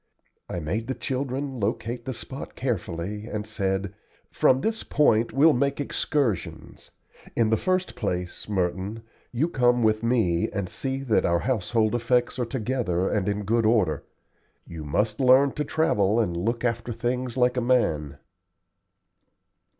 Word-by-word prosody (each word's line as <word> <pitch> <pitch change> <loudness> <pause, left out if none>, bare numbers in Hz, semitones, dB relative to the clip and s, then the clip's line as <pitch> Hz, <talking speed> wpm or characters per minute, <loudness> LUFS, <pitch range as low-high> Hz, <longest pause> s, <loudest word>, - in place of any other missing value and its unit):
I 90 - -3
made 100 +9 -3
the 130 - -2
children 130 +1 -3
locate 115 +3 -2
the 130 - -3
spot 130 +4 -8
carefully, 105 -3 -3
and 105 -3 -4
said: 95 -2 -2 0.4
"From 130 +1 +3
this 225 0 -1
point 115 -6 +3
we'll 150 +3 +5
make 140 +3 0
excursions. 135 - -2 0.5
In 115 -2 +2
the - - +5
first 185 - 0
place, 90 -4 -3
Merton, 95 +3 -2 0.3
you 130 +7 +1
come 125 -6 +2
with 110 0 +2
me 115 -8 +1
and 100 -2 -3
see 135 +9 -3
that 115 -6 +2
all 85 - +2
our 85 - +3
household 115 -2 +1
effects 120 +1 +1
are 120 - +1
together 115 -7 -1
and 105 -1 0
in 105 0 -2
good 115 +3 +1
order. 95 -10 +2 0.6
You 80 -2 -8
must 105 +9 0
learn 135 +1 +5
to 150 - -2
travel 115 -10 +2
and 90 -7 0
look 115 +8 -1
after 115 0 -1
things 125 +2 -2
like 125 0 +3
a 125 - 0
man." 80 - +1
115 Hz, 150 wpm, -25 LUFS, 100-130 Hz, 0.6 s, we'll